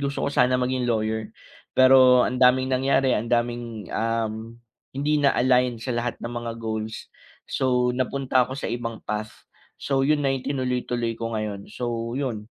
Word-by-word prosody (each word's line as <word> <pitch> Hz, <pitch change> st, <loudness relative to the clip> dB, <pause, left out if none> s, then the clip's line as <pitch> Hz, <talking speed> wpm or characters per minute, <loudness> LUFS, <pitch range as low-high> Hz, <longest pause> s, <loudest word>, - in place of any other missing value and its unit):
gusto 140 Hz, 0 st, -2 dB
ko -, -, +1 dB
sana 125 Hz, -1 st, +3 dB
maging 125 Hz, 0 st, -1 dB
lawyer. 110 Hz, -1 st, -1 dB, 0.5 s
Pero 130 Hz, -1 st, +7 dB
ang 125 Hz, +1 st, -3 dB
daming 130 Hz, +1 st, +5 dB
nangyari, 135 Hz, 0 st, +2 dB
ang 115 Hz, +2 st, -3 dB
daming, 120 Hz, -3 st, -1 dB
um, 115 Hz, 0 st, -2 dB, 0.3 s
hindi 145 Hz, +2 st, 0 dB
na-align 125 Hz, -3 st, +3 dB
sa 125 Hz, +2 st, -4 dB
lahat 120 Hz, 0 st, -2 dB
ng 120 Hz, -, -6 dB
mga 120 Hz, -1 st, -4 dB
goals, 110 Hz, -1 st, -4 dB, 0.4 s
so 125 Hz, -1 st, +1 dB
napunta 130 Hz, 0 st, +1 dB
ako 130 Hz, +2 st, -5 dB
sa -, -, -3 dB
ibang 115 Hz, -2 st, -4 dB
path. 105 Hz, 0 st, -5 dB, 0.3 s
So 135 Hz, -1 st, 0 dB
'yun 150 Hz, +2 st, +3 dB
na 135 Hz, -, +2 dB
'yung 130 Hz, -, -5 dB
tinuloy-tuloy 125 Hz, -3 st, -2 dB
ko 115 Hz, 0 st, -4 dB
ngayon. 105 Hz, -3 st, -4 dB
So 120 Hz, 0 st, -3 dB
'yon. 115 Hz, -6 st, -4 dB
120 Hz, 165 wpm, -24 LUFS, 115-130 Hz, 0.5 s, Pero